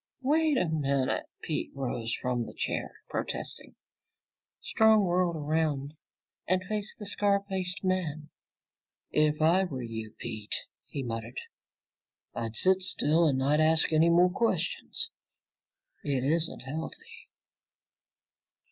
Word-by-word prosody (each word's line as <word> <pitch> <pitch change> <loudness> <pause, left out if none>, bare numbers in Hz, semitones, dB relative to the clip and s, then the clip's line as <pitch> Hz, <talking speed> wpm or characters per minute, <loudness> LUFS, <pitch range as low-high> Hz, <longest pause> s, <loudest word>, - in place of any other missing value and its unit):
"Wait 305 +1 +3
a 180 - +2
minute!" 140 -4 0 0.2
Pete 155 - -2
rose 120 -4 -3
from 125 -2 -2
his - - -10
chair, - - -4
protesting. - - -4 0.8
Strong 220 -1 +4
whirled 175 -1 +1
around 150 -2 -1 0.5
and 185 +1 +2
faced 210 +2 -3
the 210 - -7
scar 200 0 +2
faced 190 -1 -2
man. 160 -5 -1 0.8
"If 150 0 +2
I 180 +4 +4
were 130 -8 -5
you, 110 -2 -6
Pete," 110 -3 -3 0.3
he 140 - -4
muttered, 115 +1 -5 0.9
"I'd 115 -1 -4
sit 190 +7 +4
still 165 -2 +3
and 135 -3 +2
not 140 +3 +2
ask 160 +1 +4
any 160 +2 +5
more 175 +2 +5
questions. 455 - 0 0.9
It 135 -3 -1
isn't 160 +4 0
healthy!" 145 +5 -7
155 Hz, 120 wpm, -29 LUFS, 135-185 Hz, 0.9 s, any